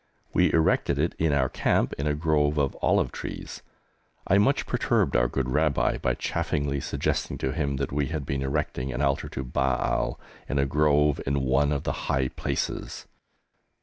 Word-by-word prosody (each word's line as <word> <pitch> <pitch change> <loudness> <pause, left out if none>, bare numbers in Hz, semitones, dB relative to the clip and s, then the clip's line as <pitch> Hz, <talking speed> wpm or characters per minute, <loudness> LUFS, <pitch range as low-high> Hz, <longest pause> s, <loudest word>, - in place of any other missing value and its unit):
We - - +4
erected 80 -3 +2
it 80 +4 0
in 80 -1 +2
our 70 -2 +2
camp - - +1
in 70 - -3
a 75 - +1
grove 75 -1 +1
of 70 -2 +1
olive - - +2
trees. - - -7 0.6
I 95 - +4
much 120 +8 +2
perturbed - - +1
our - - +4
good 65 +1 -2
Rabbi 75 0 +1
by - - 0
chaffingly 70 -2 -1
suggesting - - -2
to 65 - -2
him 70 -2 -1
that 70 0 -3
we 70 0 0
had 75 -3 -4
been 70 0 -2
erecting 65 -1 -2
an 65 +3 -2
altar 70 -1 0
to 65 - -5
Baal, 65 0 0 0.3
in 70 - -1
a 70 - +3
grove, 75 0 +2
in 70 0 +1
one 65 +3 +2
of 70 -2 -1
the - - -3
high 65 -1 +1
places! - - -3
70 Hz, 180 wpm, -26 LUFS, 65-75 Hz, 0.6 s, We